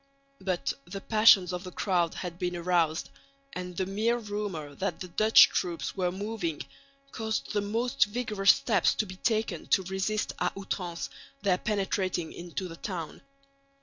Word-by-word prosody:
But 175 Hz, -7 st, -1 dB
the 180 Hz, +3 st, -6 dB
passions 200 Hz, -4 st, +5 dB
of 180 Hz, +1 st, -4 dB
the 180 Hz, -, -7 dB
crowd 175 Hz, -3 st, 0 dB
had 175 Hz, -1 st, -6 dB
been 180 Hz, -1 st, -1 dB
aroused, 170 Hz, -2 st, +1 dB, 0.4 s
and 180 Hz, -1 st, -6 dB
the 190 Hz, -, 0 dB
mere 215 Hz, +5 st, +1 dB
rumour 205 Hz, -9 st, -4 dB
that 190 Hz, +7 st, -3 dB
the 185 Hz, -, -6 dB
Dutch 215 Hz, +5 st, +7 dB
troops 170 Hz, -6 st, -2 dB
were 180 Hz, -2 st, 0 dB
moving 195 Hz, -5 st, -3 dB, 0.5 s
caused 220 Hz, -2 st, -3 dB
the 205 Hz, -, +1 dB
most 230 Hz, +6 st, +1 dB
vigorous 210 Hz, -3 st, 0 dB
steps 200 Hz, -7 st, +4 dB
to 215 Hz, -, 0 dB
be 185 Hz, -2 st, -9 dB
taken 215 Hz, -6 st, -1 dB
to 190 Hz, -, +3 dB
resist 190 Hz, +3 st, -1 dB
à -, -, 0 dB
outrance 180 Hz, -3 st, -4 dB, 0.3 s
their 185 Hz, -3 st, +2 dB
penetrating 190 Hz, -4 st, -1 dB
into 175 Hz, +2 st, -5 dB
the 165 Hz, -1 st, -9 dB
town. 170 Hz, -6 st, -5 dB
190 Hz, 155 wpm, -29 LUFS, 175-210 Hz, 0.5 s, Dutch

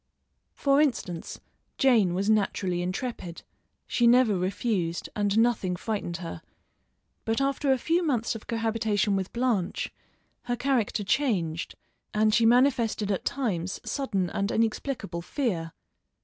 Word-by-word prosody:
For 280 Hz, +1 st, +3 dB
instance, 190 Hz, -, -2 dB, 0.4 s
Jane 220 Hz, -10 st, +4 dB
was 195 Hz, +2 st, -1 dB
naturally 195 Hz, -4 st, +1 dB
intrepid; 185 Hz, -1 st, -4 dB, 0.4 s
she 240 Hz, -, +2 dB
never 240 Hz, -3 st, +5 dB
refused, 185 Hz, -2 st, -1 dB
and 205 Hz, 0 st, +1 dB
nothing 225 Hz, -6 st, +2 dB
frightened 185 Hz, -3 st, -3 dB
her, 165 Hz, -, -7 dB, 0.8 s
but 225 Hz, +2 st, 0 dB
after 275 Hz, 0 st, +1 dB
a 265 Hz, -, +4 dB
few 335 Hz, +7 st, +1 dB
months 250 Hz, -10 st, 0 dB
of 225 Hz, -, -9 dB
cohabitation 220 Hz, -3 st, 0 dB
with 190 Hz, -1 st, -2 dB
Blanche 235 Hz, -7 st, -1 dB, 0.5 s
her 245 Hz, 0 st, 0 dB
character 245 Hz, -5 st, 0 dB
changed 190 Hz, -, 0 dB, 0.4 s
and 215 Hz, 0 st, +3 dB
she 230 Hz, 0 st, +5 dB
manifested 235 Hz, -4 st, +3 dB
at 195 Hz, -, -2 dB
times 190 Hz, -9 st, -2 dB
sudden 200 Hz, -10 st, -1 dB
and 200 Hz, 0 st, -1 dB
inexplicable 220 Hz, -5 st, -1 dB
fear. 175 Hz, -, -2 dB
220 Hz, 125 wpm, -27 LUFS, 185-245 Hz, 0.8 s, never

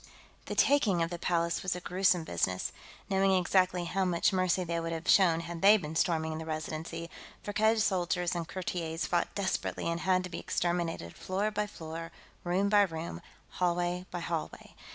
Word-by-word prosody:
The -, -, -4 dB
taking 210 Hz, -12 st, +3 dB
of 165 Hz, -, -3 dB
the 175 Hz, -, -4 dB
Palace 170 Hz, -1 st, 0 dB
was 185 Hz, -1 st, -1 dB
a -, -, -4 dB
gruesome 180 Hz, -1 st, +2 dB
business. 95 Hz, -11 st, -1 dB, 0.4 s
Knowing 195 Hz, 0 st, +3 dB
exactly 185 Hz, -1 st, +2 dB
how 190 Hz, +3 st, 0 dB
much 180 Hz, 0 st, +2 dB
mercy 185 Hz, 0 st, +2 dB
they 170 Hz, -1 st, -2 dB
would 165 Hz, 0 st, -3 dB
have 165 Hz, +2 st, -5 dB
shown 170 Hz, -4 st, +5 dB
had 170 Hz, 0 st, -7 dB
they 205 Hz, +2 st, +8 dB
been 160 Hz, -5 st, -6 dB
storming 160 Hz, -1 st, 0 dB
the 160 Hz, -, -6 dB
Residency, 160 Hz, +2 st, -4 dB, 0.4 s
Firkked's 220 Hz, +1 st, +2 dB
soldiers 180 Hz, -2 st, 0 dB
and 170 Hz, -2 st, -3 dB
courtiers 170 Hz, -3 st, -3 dB
fought 175 Hz, -1 st, -1 dB
desperately 195 Hz, -3 st, -2 dB
and 170 Hz, 0 st, -1 dB
had 185 Hz, 0 st, +2 dB
to 180 Hz, -, -6 dB
be 170 Hz, -, -4 dB
exterminated, 170 Hz, -, -2 dB
floor 200 Hz, +3 st, -1 dB
by 210 Hz, 0 st, -1 dB
floor, 165 Hz, -2 st, -7 dB, 0.3 s
room 180 Hz, +3 st, +1 dB
by 205 Hz, 0 st, +5 dB
room, 170 Hz, -4 st, -2 dB, 0.3 s
hallway 175 Hz, 0 st, -1 dB
by 175 Hz, -, -5 dB
hallway. 165 Hz, -1 st, -4 dB
175 Hz, 175 wpm, -30 LUFS, 165-185 Hz, 0.4 s, they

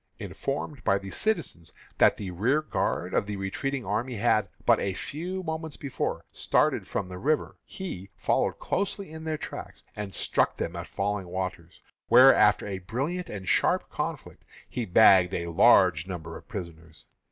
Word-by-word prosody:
Informed 140 Hz, -1 st, -4 dB
by 100 Hz, -, +2 dB
citizens 150 Hz, -, -1 dB, 0.3 s
that -, -, +5 dB
the 95 Hz, -3 st, -5 dB
rearguard 130 Hz, -, 0 dB
of -, -, +1 dB
the 105 Hz, -, -3 dB
retreating 120 Hz, +7 st, -3 dB
army 115 Hz, +6 st, -2 dB
had 110 Hz, 0 st, +2 dB, 0.2 s
but -, -, +5 dB
a 95 Hz, -2 st, -2 dB
few 180 Hz, -, -5 dB
moments 160 Hz, -2 st, -4 dB
before 140 Hz, -3 st, -3 dB
started -, -, +1 dB
from -, -, -3 dB
the 90 Hz, 0 st, -8 dB
river, 150 Hz, +6 st, -1 dB
he 100 Hz, -, -7 dB
followed 105 Hz, -, 0 dB
closely 200 Hz, -2 st, -3 dB
in 160 Hz, 0 st, -8 dB
their 155 Hz, -1 st, -1 dB
tracks, -, -, -8 dB
and 105 Hz, -2 st, -5 dB
struck -, -, +1 dB
them 85 Hz, -, -3 dB
at 85 Hz, 0 st, -6 dB
Falling 100 Hz, -1 st, -2 dB
Waters, 90 Hz, -2 st, -5 dB, 0.2 s
where, 130 Hz, +2 st, +8 dB
after 105 Hz, -2 st, +4 dB
a 100 Hz, -2 st, -4 dB
brilliant 140 Hz, -, -3 dB
and 95 Hz, -3 st, -7 dB
sharp -, -, +2 dB
conflict, -, -, -5 dB, 0.2 s
he 120 Hz, -, -3 dB
bagged 95 Hz, -2 st, +6 dB
a 85 Hz, 0 st, -3 dB
large 90 Hz, -3 st, +5 dB
number 80 Hz, -3 st, -6 dB
of -, -, -12 dB
prisoners. 85 Hz, -, -9 dB
105 Hz, 160 wpm, -27 LUFS, 90-140 Hz, 0.3 s, where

